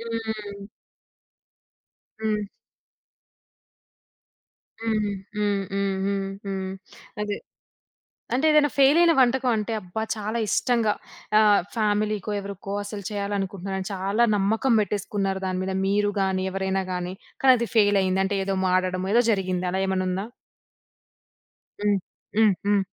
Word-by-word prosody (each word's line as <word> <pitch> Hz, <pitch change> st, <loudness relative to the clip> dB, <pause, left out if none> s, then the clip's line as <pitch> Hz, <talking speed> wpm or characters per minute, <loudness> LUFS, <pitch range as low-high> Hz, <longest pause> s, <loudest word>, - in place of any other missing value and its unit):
హ్మ్. 220 Hz, -3 st, -5 dB, 1.6 s
హ్మ్. 210 Hz, -2 st, 0 dB, 2.3 s
హుహు. 215 Hz, -2 st, 0 dB, 0.3 s
హ్మ్. 205 Hz, -1 st, +1 dB
హ్మ్. 195 Hz, -1 st, 0 dB
హ్మ్. 195 Hz, -1 st, -1 dB, 0.2 s
హ్మ్. 190 Hz, -1 st, -3 dB, 0.5 s
అదే. 210 Hz, -1 st, -2 dB, 1.0 s
అంటే, 265 Hz, +5 st, +2 dB
ఏదన్నా 300 Hz, -1 st, +5 dB
ఫెయిలయిన 330 Hz, +5 st, +6 dB
వంటకవంటే, 240 Hz, -3 st, +2 dB
అబ్బా! 185 Hz, +3 st, -5 dB
చాలా 215 Hz, +2 st, -3 dB
ఇష్టంగా 235 Hz, -2 st, +2 dB, 0.5 s
ఆహ్, 210 Hz, -3 st, +5 dB
ఫ్యామిలీకో, 210 Hz, -1 st, 0 dB
ఎవరుకో, 200 Hz, 0 st, -7 dB
అసలు 205 Hz, 0 st, -6 dB
చెయ్యాలనుకుంటున్నానని 195 Hz, -2 st, -3 dB
చాలా 195 Hz, +5 st, +1 dB
నమ్మకం 220 Hz, +5 st, +2 dB
పెట్టేసుకున్నారు 200 Hz, -1 st, -1 dB
దాని 185 Hz, 0 st, -1 dB
మీద, 190 Hz, 0 st, -2 dB
మీరు 205 Hz, +1 st, +2 dB
గానీ, 190 Hz, -1 st, 0 dB
ఎవరైనా 190 Hz, 0 st, -1 dB
గానీ, 180 Hz, 0 st, -3 dB, 0.3 s
కానది 250 Hz, -3 st, +5 dB
ఫెయిలైయింది. 195 Hz, -3 st, +4 dB
అంటే, 200 Hz, +1 st, -1 dB
ఏదో 195 Hz, 0 st, -1 dB
మాడడమో 185 Hz, 0 st, +1 dB
ఏదో 240 Hz, -, +6 dB
జరిగింది. 185 Hz, -3 st, 0 dB
అలా 190 Hz, +1 st, -1 dB
ఏమన్నుందా? 190 Hz, +1 st, -1 dB, 1.6 s
హ్మ్. 205 Hz, -2 st, +3 dB, 0.4 s
హ్మ్. 215 Hz, -3 st, +6 dB
హ్మ్. 205 Hz, -1 st, +4 dB
200 Hz, 105 wpm, -25 LUFS, 190-220 Hz, 2.3 s, ఫెయిలయిన